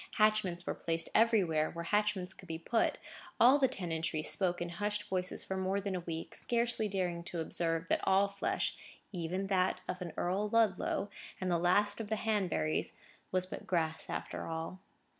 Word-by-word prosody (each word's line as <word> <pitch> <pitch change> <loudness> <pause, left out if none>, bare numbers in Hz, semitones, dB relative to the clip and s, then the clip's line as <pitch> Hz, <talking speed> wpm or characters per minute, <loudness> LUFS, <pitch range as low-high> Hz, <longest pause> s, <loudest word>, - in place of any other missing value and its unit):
Hatchments 210 -5 +2
were - - -1
placed 165 0 -2
everywhere, 190 -9 +3
where 170 0 -6
hatchments 205 -2 +1
could 185 - -14
be 160 -1 -3
put. 225 +8 +1 0.4
All 260 +4 +7
the 265 - +5
tenantry 165 -8 -1
spoke 180 0 +2
in 175 - -3
hushed 205 +4 -1
voices 185 -2 -2
for 190 - -4
more 190 +1 0
than 200 -1 -3
a - - -1
week, 165 -1 -5
scarcely 235 -2 +1
daring 180 -3 -1
to 175 - -4
observe 165 +1 -1
that - - +2
all 195 +1 +4
flesh, 200 0 -1 0.4
even 180 +1 -2
that 190 -1 +1
of 180 +1 -4
an 175 -2 -4
Earl 195 +4 0
Ludlow, 205 -2 +1 0.3
and 185 -1 -1
the 170 - +2
last 205 +5 +3
of 220 - -5
the 220 - 0
Hanburys, 185 - 0 0.4
was 185 -1 +1
but 185 - -8
grass 160 -3 0
after - - -4
all. 165 +3 -4
185 Hz, 180 wpm, -33 LUFS, 170-205 Hz, 0.4 s, All